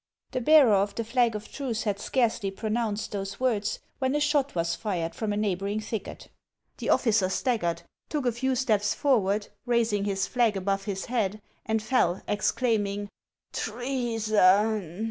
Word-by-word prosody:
The 255 Hz, -, -2 dB
bearer 285 Hz, -4 st, +6 dB
of 200 Hz, +1 st, +1 dB
the 230 Hz, -, -2 dB
flag 235 Hz, 0 st, +1 dB
of 210 Hz, +1 st, -7 dB
truce 245 Hz, -6 st, -3 dB
had 205 Hz, -2 st, -1 dB
scarcely 225 Hz, -3 st, 0 dB
pronounced 215 Hz, +1 st, -2 dB
those 195 Hz, -1 st, -4 dB
words, 220 Hz, -5 st, 0 dB, 0.2 s
when 260 Hz, +1 st, 0 dB
a -, -, +2 dB
shot 290 Hz, -2 st, +1 dB
was 170 Hz, 0 st, 0 dB
fired 175 Hz, -4 st, -3 dB
from 220 Hz, -2 st, -3 dB
a 205 Hz, -, -1 dB
neighboring 200 Hz, 0 st, -1 dB
thicket. 215 Hz, -1 st, -6 dB, 0.5 s
The -, -, -3 dB
officer 215 Hz, -6 st, +3 dB
staggered, 180 Hz, -6 st, -1 dB, 0.3 s
took 295 Hz, -4 st, -2 dB
a 245 Hz, -, +3 dB
few 260 Hz, +3 st, -1 dB
steps 215 Hz, -5 st, +1 dB
forward, 215 Hz, -8 st, +1 dB, 0.2 s
raising 230 Hz, -4 st, +1 dB
his 195 Hz, -1 st, 0 dB
flag 235 Hz, -5 st, +1 dB
above 195 Hz, +1 st, -1 dB
his 195 Hz, -3 st, -3 dB
head, 215 Hz, -4 st, -1 dB, 0.3 s
and 220 Hz, -1 st, 0 dB
fell, 220 Hz, -7 st, +1 dB
exclaiming: 205 Hz, -2 st, 0 dB, 0.2 s
" -, -, -54 dB
Treason 215 Hz, -6 st, +1 dB
215 Hz, 160 wpm, -27 LUFS, 200-240 Hz, 0.5 s, bearer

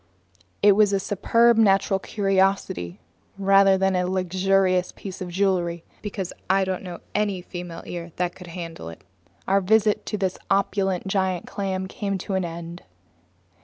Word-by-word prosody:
It 205 Hz, -, +8 dB
was 205 Hz, 0 st, +4 dB
a 195 Hz, -, +2 dB
superb 230 Hz, +4 st, +3 dB
natural 195 Hz, -2 st, +3 dB
curiosity 190 Hz, -, 0 dB, 0.4 s
rather 195 Hz, 0 st, +5 dB
than 190 Hz, 0 st, +1 dB
a 180 Hz, 0 st, +1 dB
luxurious 185 Hz, 0 st, +1 dB
piece 190 Hz, -1 st, -9 dB
of 180 Hz, -, -4 dB
jewelry, 175 Hz, -2 st, 0 dB, 0.2 s
because 195 Hz, -3 st, -5 dB, 0.2 s
I 195 Hz, +1 st, +4 dB
don't 185 Hz, -1 st, -2 dB
know 180 Hz, -2 st, -7 dB
of -, -, -13 dB
any 205 Hz, -3 st, 0 dB
female 175 Hz, -2 st, -7 dB
ear 170 Hz, -1 st, -6 dB
that 180 Hz, -1 st, -1 dB
could 180 Hz, -, -12 dB
handle 165 Hz, -, -7 dB
it. 80 Hz, -, -12 dB, 0.4 s
Our 195 Hz, +1 st, +3 dB
visit 210 Hz, +2 st, +3 dB
to 210 Hz, -, -2 dB
this 190 Hz, -2 st, -2 dB
opulent 195 Hz, -1 st, +1 dB
giant 190 Hz, -2 st, 0 dB
clam 190 Hz, -1 st, -3 dB
came 200 Hz, 0 st, -3 dB
to 195 Hz, -, -5 dB
an 190 Hz, -1 st, +1 dB
end. 170 Hz, +1 st, -7 dB
190 Hz, 160 wpm, -24 LUFS, 180-195 Hz, 0.4 s, It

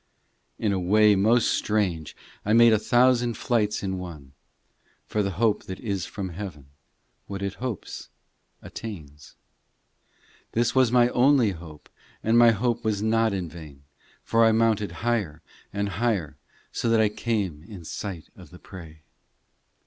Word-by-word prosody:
IV -, -, -5 dB
In 100 Hz, -, +2 dB
a 95 Hz, -, 0 dB
way 105 Hz, +3 st, +4 dB
most 110 Hz, +4 st, +3 dB
strange 95 Hz, -8 st, -1 dB, 0.3 s
I 105 Hz, -, +1 dB
made 115 Hz, 0 st, +7 dB
a 110 Hz, -, +3 dB
thousand 120 Hz, 0 st, +3 dB
flights 105 Hz, -4 st, 0 dB
in 95 Hz, -1 st, -2 dB
one, 80 Hz, -7 st, -9 dB, 0.7 s
For 105 Hz, -, -1 dB
the 100 Hz, -, -1 dB
hope 110 Hz, -1 st, +1 dB
that 95 Hz, -, -7 dB
is 100 Hz, -5 st, -3 dB
from 95 Hz, -3 st, -5 dB
heaven, 85 Hz, -7 st, -8 dB, 0.6 s
What 100 Hz, -1 st, -5 dB
it 100 Hz, -1 st, -2 dB
hopes, 125 Hz, -7 st, -6 dB, 0.5 s
attains; 75 Hz, -10 st, -9 dB, 1.2 s
This 115 Hz, 0 st, +1 dB
was 130 Hz, -3 st, +3 dB
my 120 Hz, -1 st, +4 dB
only 125 Hz, -3 st, +4 dB
hope 80 Hz, -4 st, -11 dB, 0.4 s
And 110 Hz, +1 st, +2 dB
my 120 Hz, 0 st, +7 dB
hope 115 Hz, +2 st, 0 dB
was 105 Hz, -2 st, -1 dB
not 115 Hz, 0 st, +2 dB
in 95 Hz, -3 st, -3 dB
vain, 75 Hz, -4 st, -12 dB, 0.4 s
For 115 Hz, 0 st, +2 dB
I 115 Hz, -, +5 dB
mounted 110 Hz, -2 st, +1 dB
higher 100 Hz, -10 st, -1 dB, 0.3 s
and 100 Hz, 0 st, -2 dB
higher, 100 Hz, -7 st, -1 dB, 0.4 s
So 115 Hz, -, -2 dB
that 115 Hz, -1 st, +3 dB
I 110 Hz, -, +4 dB
came 105 Hz, -7 st, -2 dB
in 100 Hz, -3 st, -11 dB
sight 90 Hz, -1 st, -6 dB
of -, -, -14 dB
the -, -, -13 dB
prey. 80 Hz, -4 st, -12 dB
105 Hz, 155 wpm, -25 LUFS, 90-115 Hz, 1.2 s, made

